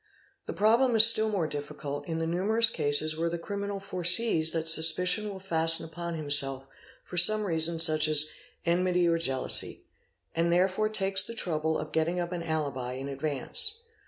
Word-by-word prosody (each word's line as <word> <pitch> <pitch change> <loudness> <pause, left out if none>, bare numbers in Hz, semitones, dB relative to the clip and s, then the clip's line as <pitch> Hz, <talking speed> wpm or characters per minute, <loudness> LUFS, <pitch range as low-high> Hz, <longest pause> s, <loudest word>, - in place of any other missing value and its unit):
The - - -5
problem 230 +4 +1
is 220 0 +8
still 220 -1 +3
more 195 -6 -2
difficult 145 -1 -8
in 160 - -5
the 165 - -3
numerous 210 +7 +1
cases 155 +1 -1
where 165 +1 -3
the 170 - -5
criminal 200 +3 -6
foresees 180 -2 +1
that 160 0 -4
suspicion 180 +6 +2
will 195 - -9
fasten 165 -3 0
upon 170 +1 -7
himself 140 -3 +1 0.4
for 180 - -10
some 215 +5 +6
reason 165 -3 -1
such 155 -1 +2
as 155 -1 +5 0.4
enmity 180 0 0
or 165 0 0
jealousy, 135 -5 +2 0.5
and 170 +1 -1
therefore 190 +4 0
takes 195 -2 +4
the 230 +4 -3
trouble 160 -6 -3
of 155 - -8
getting 160 +3 -2
up 175 0 -5
an 175 -1 -5
alibi 145 -6 -5
in 135 +2 -8
advance. 155 - -1
170 Hz, 170 wpm, -26 LUFS, 155-195 Hz, 0.5 s, is